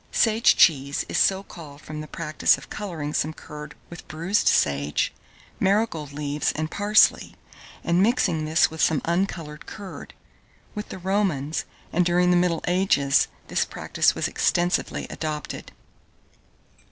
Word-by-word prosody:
Sage 225 0 +4
cheese 140 -3 +3
is - - -1
so 190 0 +3
called 150 -7 -12
from 155 0 -7
the 155 - -8
practice 155 -1 +1
of - - -14
colouring 165 -8 -5
some 155 +2 -1
curd 150 -1 -10 0.2
with 170 - -10
bruised 170 +7 0
sage, 70 0 +1 0.5
marigold 190 -7 0
leaves, 145 0 -1
and 155 +1 -3
parsley, 210 +1 +3 0.5
and 170 +2 +2
mixing 195 -8 +2
this 155 +1 +3
with 160 - -5
some 155 - +2
uncoloured 170 -3 -2
curd. 200 -3 -9 0.6
With 210 -1 -6
the - - -7
Romans, 180 -6 -1 0.3
and 180 - +3
during 180 +1 +3
the - - +4
middle 175 -2 +1
ages, 175 -7 +2 0.2
this - - +1
practice - - 0
was - - -1
extensively 175 +1 0
adopted. 155 -2 -5
165 Hz, 140 wpm, -24 LUFS, 150-190 Hz, 0.6 s, Sage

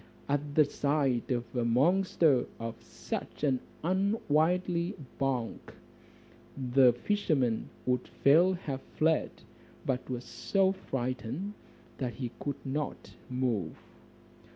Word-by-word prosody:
At 145 0 -1
the 155 - +7
sight 140 -4 0
of 120 -1 -2
a 120 - +1
monster 150 +2 +3
of 115 0 -3
such 115 - -6
an 135 -3 +3 0.2
unwieldy 180 -1 +1 0.2
bulk, 130 -4 -2 0.8
the 130 -1 +5
fisherman 130 - 0 0.2
would 125 -1 0
fain 170 +7 +4
have 140 -6 -4
fled, 160 0 +1 0.6
but 130 -1 -1
was 125 -1 -3
so 195 -1 +1
frightened, 130 - -3 0.5
that 125 -3 -2
he 125 -3 -4
could 145 -1 -4
not 140 +2 -3 0.2
move. 125 -10 -1
140 Hz, 105 wpm, -31 LUFS, 125-165 Hz, 0.8 s, the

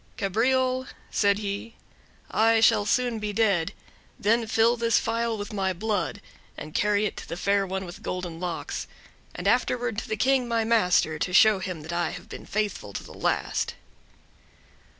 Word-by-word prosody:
"Cabriole," 255 +6 +1 0.2
said 200 -1 +3
he, 205 +2 -5 0.6
"I 225 +1 +4
shall 210 -2 +4
soon 245 0 +1
be 210 -1 -3
dead; 200 -5 +2 0.5
then 225 +2 +2
fill 225 +2 +3
this 230 -2 +2
phial 230 0 0
with 205 +1 -6
my 190 -2 0
blood, 205 +1 -2 0.4
and 150 - -8
carry 210 0 +2
it 210 - -2
to - - -8
the 170 - -4
Fair 200 +1 +1
One 190 +1 -3
with 175 - -10
Golden 180 -2 -4
Locks, 175 -2 -4 0.5
and - - -3
afterward 245 -3 +1
to - - -8
the 220 - -1
King, 260 +2 +2
my 230 -1 +1
master, 180 -8 +2
to 180 - -2
show 215 +1 +6
him 180 -5 -5
I 170 -1 0
have 180 - -9
been - - -9
faithful 200 - -2
to - - -5
the - - -12
last." - - -1
210 Hz, 170 wpm, -26 LUFS, 190-230 Hz, 0.6 s, show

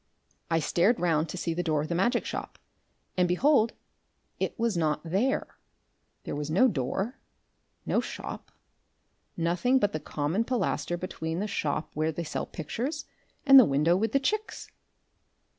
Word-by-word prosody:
I 165 - +2
stared 185 +9 +2
round 165 -2 +1
to - - -5
see 170 -2 -2
the 175 - -1
door 155 -4 0
of - - -5
the 170 - -2
magic 235 +8 +1
shop, - - -5 0.6
and, 180 -1 +3
behold, 230 +5 +3 0.7
it - - -2
was 230 -3 0
not 155 -3 +1
there! 200 - -1 0.6
There - - -4
was 150 +1 -4
no 190 +11 +5
door, 190 - -2 0.7
no - - +2
shop, - - -7 0.9
nothing, 175 +10 +1
only 260 -6 +4
the 155 - -4
common 150 +7 -1
pilaster 220 -7 -1
between 165 -2 -4
the 205 - -1
shop 155 -6 -2
where 155 +1 0
they 170 +2 -4
sell 155 - -4
pictures 250 - -4 0.4
and 275 -1 +10
the - - +9
window 150 +5 +3
with 215 +3 0
the 275 - +3
chicks!... 430 +10 -3
180 Hz, 160 wpm, -28 LUFS, 160-235 Hz, 0.9 s, and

